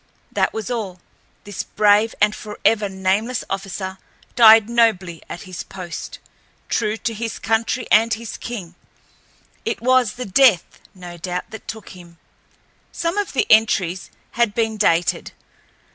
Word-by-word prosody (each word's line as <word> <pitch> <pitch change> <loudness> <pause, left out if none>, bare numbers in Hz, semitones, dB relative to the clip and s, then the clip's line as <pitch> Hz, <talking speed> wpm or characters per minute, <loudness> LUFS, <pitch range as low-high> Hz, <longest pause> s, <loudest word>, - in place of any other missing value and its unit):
That - - +1
was 220 +2 -5
all. 200 -7 -4 0.4
This 205 -2 -5
brave 210 +1 +2
and 210 0 +3
forever 210 0 0
nameless 195 +6 -1
officer 190 -1 -4 0.4
died 225 -2 +8
nobly 215 -8 +1
at 175 - -7
his 185 -2 -7
post—true 200 +4 -6
to 230 0 -3
his 225 +1 -4
country 225 +2 -1
and 225 +2 +5
his 225 0 -4
king. 195 -8 -7 0.9
It - - -2
was 255 -3 +3
the 250 - -6
Death, 205 -2 +3 0.2
no 175 -2 -10
doubt, 180 +1 -5
that 220 - -10
took 220 -2 -7
him. 175 -2 -14 0.7
Some 340 +4 -2
of 410 - -3
the 270 - +1
entries 195 -5 +3 0.2
had 235 -4 0
been 225 -1 0
dated. 175 -5 +1
215 Hz, 135 wpm, -21 LUFS, 185-230 Hz, 0.9 s, died